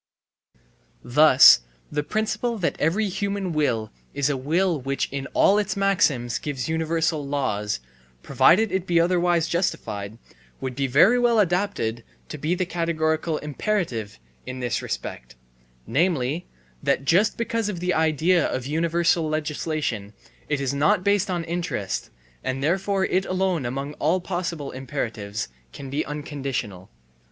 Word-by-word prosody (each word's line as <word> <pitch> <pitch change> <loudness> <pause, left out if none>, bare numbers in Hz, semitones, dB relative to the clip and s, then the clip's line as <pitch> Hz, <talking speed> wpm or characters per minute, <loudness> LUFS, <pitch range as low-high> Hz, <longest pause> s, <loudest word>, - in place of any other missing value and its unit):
Thus 130 - +7 0.3
the 150 - 0
principle 220 +6 -1
that 175 -5 -1
every 190 +8 +1
human 200 -1 -2
will 125 -8 0 0.2
is 140 +1 +1
a - - -1
will 160 +4 0
which 135 +1 -1
in 140 0 -3
all 205 +2 +5
its 205 -1 -2
maxims 165 -12 +1
gives 135 -5 -4
universal 160 -1 0
laws, 115 - -1 0.2
* - - -33
provided 205 +3 +4
it 190 0 -1
be 170 -1 +3
otherwise 175 -1 +2
justified, 110 - -2 0.4
would 130 -2 -4
be 135 +1 0
very 175 - +5
well 240 -1 +3
adapted 175 - 0 0.3
to 150 - -6
be 155 +5 0
the 185 0 -1
categorical 160 -2 -1
imperative, 150 - -2 0.3
in 130 0 -7
this 120 -2 -1
respect, - - -6 0.5
namely, 155 -1 0 0.3
that 135 - 0
just 185 +9 +3
because 230 -2 -1
of 185 -5 -4
the 180 +1 0
idea 160 +2 +2
of 130 -1 -3
universal 165 +2 +1
legislation 150 -8 -2 0.4
it 145 -2 0
is 135 -1 -1
not 150 +5 +2
based 200 -1 +2
on 175 -2 -1
interest, 165 - -3 0.3
and 130 +1 -2
therefore 190 +4 +1
it 190 +1 0
alone 185 -7 0
among 135 +4 -4
all 160 +5 +2
possible 175 -5 -4
imperatives 115 - -4 0.2
can 135 - -9
be 145 +3 0
unconditional. 135 -10 -5
155 Hz, 140 wpm, -24 LUFS, 135-180 Hz, 0.5 s, Thus